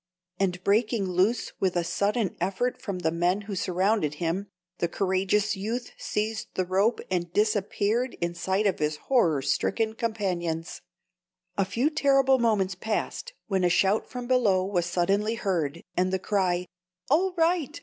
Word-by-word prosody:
and 180 Hz, -2 st, 0 dB
breaking 215 Hz, 0 st, +2 dB
loose 190 Hz, +6 st, +1 dB
with 185 Hz, -2 st, +1 dB
a 175 Hz, -, +1 dB
sudden 200 Hz, +3 st, 0 dB
effort 195 Hz, +7 st, -1 dB
from 200 Hz, -3 st, -4 dB
the 165 Hz, -3 st, 0 dB
men 175 Hz, +4 st, +1 dB
who 205 Hz, 0 st, -6 dB
surrounded 185 Hz, -3 st, +1 dB
him, 175 Hz, +5 st, -2 dB, 0.3 s
the 170 Hz, -, +1 dB
courageous 195 Hz, +3 st, +1 dB
youth 225 Hz, +5 st, -4 dB
seized 215 Hz, +1 st, -2 dB
the 185 Hz, -, 0 dB
rope 195 Hz, +6 st, +2 dB
and 175 Hz, -2 st, -1 dB
disappeared 215 Hz, +3 st, +1 dB
in 170 Hz, 0 st, -1 dB
sight 190 Hz, +4 st, 0 dB
of 195 Hz, -, +1 dB
his 150 Hz, 0 st, 0 dB
horror 165 Hz, -, +2 dB
stricken 220 Hz, -, 0 dB
companions. 180 Hz, -8 st, -2 dB, 0.7 s
A 195 Hz, -, +1 dB
few 240 Hz, +10 st, 0 dB
terrible 275 Hz, -3 st, +4 dB
moments 210 Hz, -5 st, +2 dB
passed, 220 Hz, -, -3 dB
when 190 Hz, -3 st, 0 dB
a 175 Hz, -, +4 dB
shout 195 Hz, +4 st, +2 dB
from 250 Hz, -1 st, -6 dB
below 220 Hz, -7 st, +3 dB
was 180 Hz, -3 st, 0 dB
suddenly 200 Hz, +5 st, +1 dB
heard, 170 Hz, -7 st, -2 dB
and 185 Hz, +1 st, +1 dB
the 190 Hz, -, +1 dB
cry, 185 Hz, -2 st, 0 dB, 0.5 s
"All 365 Hz, +5 st, +3 dB
right! 330 Hz, -2 st, +1 dB
195 Hz, 155 wpm, -27 LUFS, 180-225 Hz, 0.7 s, terrible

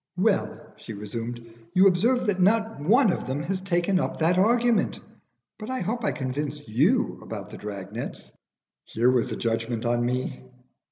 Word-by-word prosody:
"Well," 190 Hz, -6 st, 0 dB
she 115 Hz, -, -9 dB
resumed, 115 Hz, +3 st, -6 dB, 0.3 s
"you 185 Hz, +2 st, +6 dB
observe 225 Hz, +8 st, +3 dB
that 195 Hz, -4 st, 0 dB
not 220 Hz, +2 st, +2 dB
one 215 Hz, -, +4 dB
of -, -, -4 dB
them 135 Hz, +3 st, -2 dB
has 185 Hz, +2 st, -2 dB
taken 185 Hz, 0 st, +1 dB
up -, -, -2 dB
that 170 Hz, +3 st, +2 dB
argument. 235 Hz, +3 st, +2 dB, 0.6 s
But 215 Hz, +2 st, -7 dB
I 260 Hz, 0 st, -2 dB
hope 230 Hz, +6 st, -2 dB
I 205 Hz, -, +1 dB
convinced 145 Hz, +2 st, -4 dB
you 155 Hz, -, +2 dB
about 105 Hz, -4 st, -7 dB
the -, -, -8 dB
drag 100 Hz, -2 st, -7 dB
nets?" -, -, -7 dB, 0.5 s
Here 120 Hz, +3 st, +2 dB
was 125 Hz, -2 st, +1 dB
a -, -, -2 dB
judgment 115 Hz, 0 st, -2 dB
on 120 Hz, 0 st, +1 dB
me. 125 Hz, +1 st, -2 dB
160 Hz, 170 wpm, -26 LUFS, -, 0.6 s, you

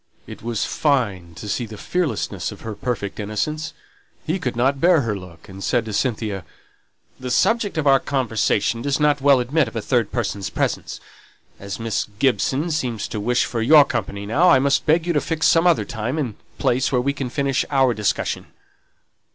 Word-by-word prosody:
It -, -, -10 dB
was 115 Hz, -1 st, -2 dB
fine 100 Hz, -, 0 dB
to 105 Hz, -, -8 dB
see 115 Hz, +3 st, -2 dB
the 110 Hz, 0 st, -9 dB
fearlessness 180 Hz, -, -2 dB
of -, -, -11 dB
her 110 Hz, -, -5 dB
perfect 105 Hz, -3 st, -4 dB
innocence. 110 Hz, +10 st, -3 dB, 0.5 s
He 170 Hz, +3 st, -1 dB
could 125 Hz, -9 st, -3 dB
not 135 Hz, +3 st, +1 dB
bear 170 Hz, -2 st, +5 dB
her 115 Hz, -4 st, -2 dB
look, 90 Hz, -4 st, -11 dB
and 95 Hz, 0 st, -9 dB
said 120 Hz, -3 st, +1 dB
to 110 Hz, -, -6 dB
Cynthia, 105 Hz, -5 st, -1 dB, 0.8 s
"The 130 Hz, -1 st, -5 dB
subject 210 Hz, -, +1 dB
of 155 Hz, -, 0 dB
our 135 Hz, -1 st, +6 dB
conversation 115 Hz, -4 st, 0 dB
does 140 Hz, +2 st, 0 dB
not 145 Hz, -1 st, +2 dB
well 140 Hz, -1 st, +5 dB
admit 135 Hz, +3 st, +1 dB
of 115 Hz, -, -9 dB
a -, -, 0 dB
third 120 Hz, -2 st, 0 dB
person's 100 Hz, -5 st, -2 dB
presence. -, -, -2 dB, 0.6 s
As 100 Hz, +1 st, -6 dB
Miss 115 Hz, -2 st, -2 dB
Gibson 135 Hz, +5 st, +1 dB
seems 125 Hz, -9 st, -2 dB
to 110 Hz, -, -4 dB
wish 120 Hz, +4 st, +1 dB
for 115 Hz, -, -3 dB
your 145 Hz, +5 st, +7 dB
company 100 Hz, -5 st, -4 dB
now, 150 Hz, -, +3 dB
I 170 Hz, -, +7 dB
must 140 Hz, +3 st, +1 dB
beg 160 Hz, +2 st, +3 dB
you 175 Hz, -, 0 dB
to 145 Hz, -, +2 dB
fix 160 Hz, -1 st, -1 dB
some 165 Hz, +1 st, +4 dB
other 120 Hz, -12 st, +3 dB
time 115 Hz, +7 st, -3 dB
and 130 Hz, -8 st, -2 dB, 0.2 s
place 130 Hz, +2 st, +1 dB
where 125 Hz, -, +2 dB
we 140 Hz, +3 st, 0 dB
can 135 Hz, -3 st, -4 dB
finish 140 Hz, +1 st, 0 dB
our 135 Hz, -3 st, +3 dB
discussion." 105 Hz, -1 st, -1 dB
125 Hz, 190 wpm, -22 LUFS, 110-145 Hz, 0.8 s, your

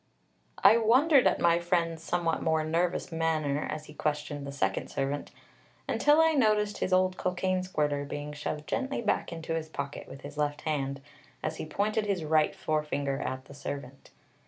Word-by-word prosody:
I 210 Hz, +3 st, +8 dB
wondered 255 Hz, +5 st, +5 dB
at -, -, +2 dB
my 170 Hz, 0 st, +4 dB
friend's 170 Hz, -2 st, 0 dB
somewhat 165 Hz, -1 st, 0 dB
more 160 Hz, -1 st, +1 dB
nervous 170 Hz, +3 st, 0 dB
manner 155 Hz, -3 st, 0 dB
as 155 Hz, 0 st, -4 dB
he 150 Hz, -, -12 dB
questioned 145 Hz, -1 st, -3 dB
the -, -, -5 dB
second 95 Hz, -9 st, -1 dB
servant, 140 Hz, +2 st, -2 dB, 0.6 s
until 295 Hz, +1 st, +4 dB
I 320 Hz, 0 st, +6 dB
noticed 215 Hz, -6 st, +2 dB
his -, -, -1 dB
old 185 Hz, 0 st, +3 dB
cocaine 185 Hz, 0 st, 0 dB
squirter 150 Hz, -6 st, -1 dB
being 145 Hz, +1 st, -5 dB
shoved 150 Hz, 0 st, -4 dB
gently 270 Hz, -2 st, -2 dB
back 210 Hz, -, 0 dB
into 165 Hz, -1 st, -4 dB
his 160 Hz, -1 st, -3 dB
pocket 140 Hz, -2 st, -5 dB
with 135 Hz, -, -10 dB
his 145 Hz, +1 st, -9 dB
left 145 Hz, 0 st, 0 dB
hand, 140 Hz, -3 st, -2 dB, 0.4 s
as 155 Hz, 0 st, -2 dB
he -, -, -5 dB
pointed 210 Hz, +5 st, 0 dB
his 190 Hz, -5 st, 0 dB
right 155 Hz, 0 st, +2 dB
forefinger 145 Hz, -3 st, -1 dB
at 130 Hz, 0 st, -4 dB
the -, -, -12 dB
servant. 140 Hz, -1 st, -7 dB
160 Hz, 175 wpm, -29 LUFS, 145-185 Hz, 0.6 s, I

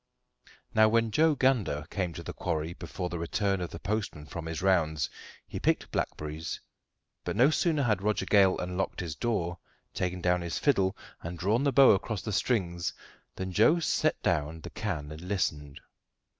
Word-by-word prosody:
Now, 110 Hz, 0 st, +6 dB
when 115 Hz, 0 st, +2 dB
Joe 155 Hz, +4 st, +4 dB
Gander 110 Hz, -, +1 dB
came 95 Hz, -4 st, -1 dB
to 85 Hz, +1 st, -7 dB
the -, -, -6 dB
quarry 80 Hz, -1 st, -2 dB
before 90 Hz, 0 st, -5 dB
the 85 Hz, -1 st, -4 dB
return 95 Hz, +3 st, 0 dB
of 90 Hz, -, -3 dB
the -, -, -7 dB
postman 100 Hz, -7 st, -3 dB
from 80 Hz, +3 st, -6 dB
his 80 Hz, +1 st, -4 dB
rounds, 80 Hz, -7 st, +2 dB, 0.4 s
he -, -, -5 dB
picked -, -, 0 dB
blackberries; 75 Hz, +1 st, -3 dB, 0.6 s
but -, -, -3 dB
no 130 Hz, +8 st, +5 dB
sooner 155 Hz, -3 st, +2 dB
had 105 Hz, -6 st, +1 dB
Roger 105 Hz, +1 st, 0 dB
Gale 95 Hz, -3 st, +5 dB
unlocked 90 Hz, +2 st, -3 dB
his 85 Hz, -3 st, -4 dB
door, 90 Hz, -8 st, -1 dB, 0.3 s
taken 90 Hz, 0 st, -2 dB
down 90 Hz, 0 st, +2 dB
his 85 Hz, -1 st, -3 dB
fiddle, 95 Hz, -10 st, +2 dB, 0.2 s
and 85 Hz, +1 st, -6 dB
drawn 105 Hz, +9 st, +1 dB
the 140 Hz, -, +3 dB
bow 135 Hz, +1 st, +7 dB
across 100 Hz, +1 st, 0 dB
the 110 Hz, -, -3 dB
strings, 90 Hz, -7 st, 0 dB, 0.4 s
than 95 Hz, 0 st, -4 dB
Joe 115 Hz, -, +4 dB
set 155 Hz, -1 st, +1 dB
down 80 Hz, -1 st, 0 dB
the -, -, -8 dB
can 80 Hz, -9 st, -4 dB
and 80 Hz, +1 st, -8 dB
listened. 80 Hz, -7 st, -2 dB
95 Hz, 175 wpm, -29 LUFS, 85-110 Hz, 0.6 s, bow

